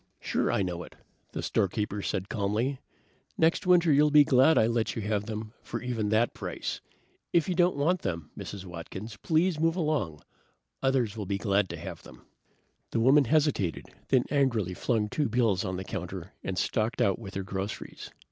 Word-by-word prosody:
"Sure - - 0
I 100 - +1
know 90 -2 -3
it," - - -11 0.4
the - - -4
storekeeper 105 +1 0
said 95 -1 -2
calmly. 110 +7 -1 0.6
"Next 165 +3 +2
winter 175 -3 +5
you'll 150 +2 +5
be 150 0 +7
glad 135 +3 +5
I - - +5
let 115 0 0
you 110 - -3
have 105 0 -1
them 110 0 -5
for - - -5
even 115 -5 -2
that 110 +3 +2
price. - - -4 0.5
If 170 -3 +3
you 185 - +1
don't 175 0 +3
want 165 +6 +1
them, 85 -5 -4
Mrs. 100 -2 -7
Watkins, 95 +5 -7
please 160 - +1
move 165 +1 +2
along. 150 - -1 0.6
Others 130 -5 +1
will 105 -4 -5
be 100 - 0
glad 100 -1 +1
to - - -5
have - - -7
them." - - -15 0.6
The - - -1
woman 135 +5 +5
hesitated, 145 - +1 0.2
then 130 -2 +3
angrily 120 - +1
flung 110 +2 0
two 145 +4 -1
bills 110 -5 +2
on 95 -2 -3
the 95 - -4
counter 95 -3 -6
and 95 -1 -3
stalked 110 +5 0
out 100 +1 +2
with 100 -4 -9
her 95 - -2
groceries. 95 +1 -5
110 Hz, 185 wpm, -28 LUFS, 100-140 Hz, 0.6 s, be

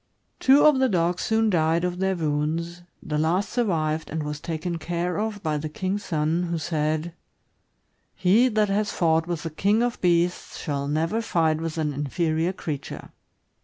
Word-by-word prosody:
Two 270 +2 +6
of 300 -3 +6
the 260 -1 +3
dogs 175 -2 +1
soon 220 -1 +2
died 165 0 +2
of 180 0 -2
their 190 0 +1
wounds; 165 +2 -2 0.2
the 150 -1 -2
last 175 +6 +1
survived, 160 -10 0
and 160 0 -3
was 150 0 -5
taken 165 +1 -3
care 175 +3 -2
of 215 -2 -3
by 155 -2 0
the 155 +1 -4
king's 190 +6 -3
son, 160 +2 0
who 170 - -1
said: 155 +1 -1 0.5
" - - -47 0.3
He 210 +7 +4
that 215 -3 +1
has 205 +1 0
fought 165 -1 +1
with 170 -3 -3
the 165 - -4
king 205 +8 +2
of 245 0 -2
beasts 175 0 +1
shall 140 -3 -3
never 165 +9 0
fight 160 -7 +1
with 165 0 -4
an 150 -2 -1
inferior 160 +4 0
creature." 155 -6 -6
170 Hz, 175 wpm, -25 LUFS, 155-190 Hz, 0.5 s, Two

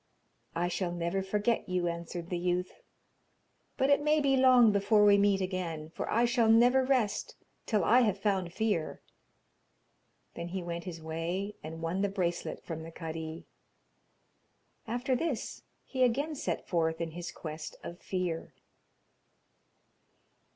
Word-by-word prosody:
'I 175 +1 +1
shall 180 0 -2
never 175 +2 -1
forget 210 +4 0
you,' 180 -1 0
answered 170 +1 -5
the 175 - 0
youth, 180 +1 0 1.1
'but 265 +2 +2
it 285 - +5
may 300 +1 +3
be 275 -2 +3
long 255 -4 +6
before 205 +1 +4
we 205 0 +7
meet 200 -1 +3
again, 170 -4 -3
for - - -5
I 235 +2 +3
shall 235 -2 +2
never 245 +4 +6
rest 250 -6 0 0.3
till 210 -5 +2
I 235 +8 +5
have 210 -5 +2
found 195 -4 0
fear.' 205 -5 -1 1.3
Then 170 - -5
he 185 +1 -4
went 170 0 -5
his 165 -3 -7
way, 170 +6 -3
and 160 +1 -7
won 170 +4 -1
the 200 - +1
bracelet 175 -3 -2
from 160 -2 -5
the 160 - -8
kadi. 160 -1 -6 1.4
After 245 +3 0
this, 300 -3 -3 0.2
he 260 - -4
again 275 +6 +2
set 300 +1 -3
forth 160 -2 0
in 165 -1 -3
his 175 +1 -6
quest 155 -1 -7
of 175 +1 -7
fear. 180 -3 -3
190 Hz, 145 wpm, -31 LUFS, 170-230 Hz, 1.4 s, we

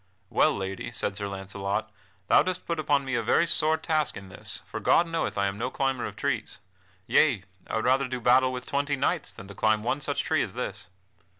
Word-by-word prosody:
"Well, - - +3
Lady," 95 +4 -4
said 105 -3 -2
Sir 100 0 -2
Launcelot, 100 +2 -3 0.4
"thou - - +6
dost 185 -1 -3
put 170 -2 -2
upon 145 -2 +2
me 130 - -3
a 120 - +2
very 140 +9 +3
sore 160 -1 +3
task 155 -8 0
in 100 -1 -10
this, 90 - -4
for - - -6
God 170 - +4
knoweth 165 -8 -2
I 100 - +2
am 100 +1 -2
no 125 +2 -1
climber 135 -2 -1
of - - -9
trees. - - -2 0.5
Yea, 125 -11 +3 0.2
I - - -3
would 110 - 0
rather 130 +1 +3
do 130 0 -3
battle 130 +2 +4
with 125 0 -5
twenty 145 +1 0
knights 135 - 0
than 95 - -11
to 100 - -9
climb 110 +1 +2
one 135 +5 -1
such - - -1
tree - - +1
as - - -4
this. - - -4
125 Hz, 220 wpm, -27 LUFS, 100-140 Hz, 0.5 s, thou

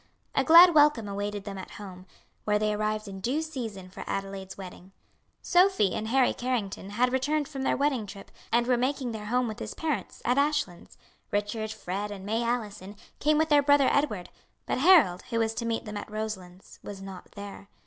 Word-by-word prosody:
A - - +2
glad 340 +2 +9
welcome 295 -7 +4
awaited 205 0 -4
them 195 -1 -6
at - - -9
home, 185 -2 -10 0.4
where 210 0 +2
they 215 0 0
arrived 215 0 -2
in 195 -1 -7
due 275 +9 0
season 225 -12 -6
for - - -8
Adelaide's 195 -1 -5
wedding. 185 0 -11 0.5
Sophie 360 - +3
and 220 - -3
Harry 260 +2 +3
Carrington 225 -6 -3
had 245 +5 +1
returned 290 +3 0
from 275 -2 -6
their 265 - +1
wedding 270 -6 0
trip, 195 +1 -11 0.2
and 235 +1 +3
were 250 0 +2
making 255 0 -1
their 215 -2 -6
home 250 +2 +1
with 215 - -6
his - - -6
parents, 310 -4 -3
at 250 +3 +3
Ashlands; 285 - -1 0.3
Richard, 210 +1 -2
Fred, 200 0 -4
and 195 -2 -8
May 220 +3 0
Allison, 210 -4 -3 0.2
came 300 0 +3
with 315 +1 +2
their 295 -1 +6
brother 285 -1 +4
Edward; 215 -11 0 0.4
but - - -1
Harold, 275 - +6
who 230 - -1
was 225 -1 +1
to 230 +1 -4
meet 230 0 -2
them 210 -1 -6
at 205 - -7
Roselands, 200 -4 -7
was 200 -1 -8
not 195 -1 -10
there. 200 0 -9
220 Hz, 195 wpm, -28 LUFS, 200-265 Hz, 0.5 s, glad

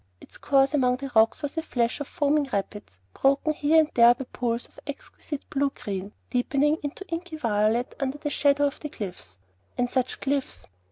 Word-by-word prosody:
Its - - -14
course 275 0 +3
among 250 -3 +3
the 275 0 -6
rocks 220 +5 +4
was 290 +1 -3
a - - +1
flash 240 -6 -1
of 290 - -4
foaming 290 -1 +1
rapids, 200 - -4
broken 275 +3 +2
here 310 +2 +4
and 310 0 -2
there 235 0 +7
by 265 - -5
pools 235 -1 -2
of - - -17
exquisite 285 0 -7
blue 280 0 +1
green, 200 -5 -6 0.2
deepening 280 +5 +2
into 295 +7 -6
inky 335 -1 -5
violet 225 -1 +1
under 275 +1 -2
the 295 0 -4
shadow 285 0 +3
of 285 +1 -2
the 300 - -6
cliffs. 180 - -7 0.4
And 245 0 0
such 255 -1 -1
cliffs! 280 -1 -2
275 Hz, 185 wpm, -26 LUFS, 235-290 Hz, 0.4 s, there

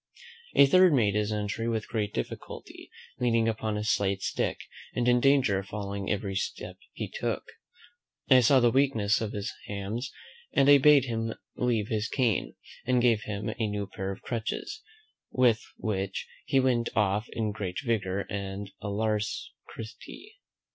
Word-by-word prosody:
A 140 - +8
third 185 +4 +6
made 110 -7 +3
his 105 0 0
entry 105 +2 -2
with 110 -2 -2
great 105 -3 -2
difficulty, - - -6 0.3
leaning 115 -2 +2
upon 110 -1 -1
a 105 - -2
slight 100 -2 +1
stick, - - -1 0.3
and 120 0 +1
in 125 0 +5
danger 130 -7 +4
of 95 - -8
falling 100 -1 -4
every 100 -1 -1
step 95 - -4 0.2
he - - -4
took. - - -3 0.8
I 130 - +7
saw 130 +2 +5
the 120 -1 +4
weakness 115 -7 +2
of 110 -1 -3
his 105 -1 -4
hams; 105 +6 -4 0.4
and 135 - +4
I 145 0 +8
bade 145 -1 +6
him 115 -2 -2 0.2
leave 115 -4 0
his 110 -1 0
cane, 120 -7 0 0.3
and 125 0 +2
gave 120 -3 +3
him 105 +1 -3
a 110 - +1
new 105 -1 -2
pair 95 0 -5
of 95 - -9
crutches, 115 - -4 0.5
with 120 -3 +3 0.2
which 95 -3 -3 0.2
he 135 - +3
went 125 -3 +2
off 105 +1 +1
in 110 -2 -1
great 95 -4 -4
vigour 100 -4 0
and 100 0 -5
alacrity. 110 - -4
110 Hz, 155 wpm, -28 LUFS, 100-120 Hz, 0.8 s, A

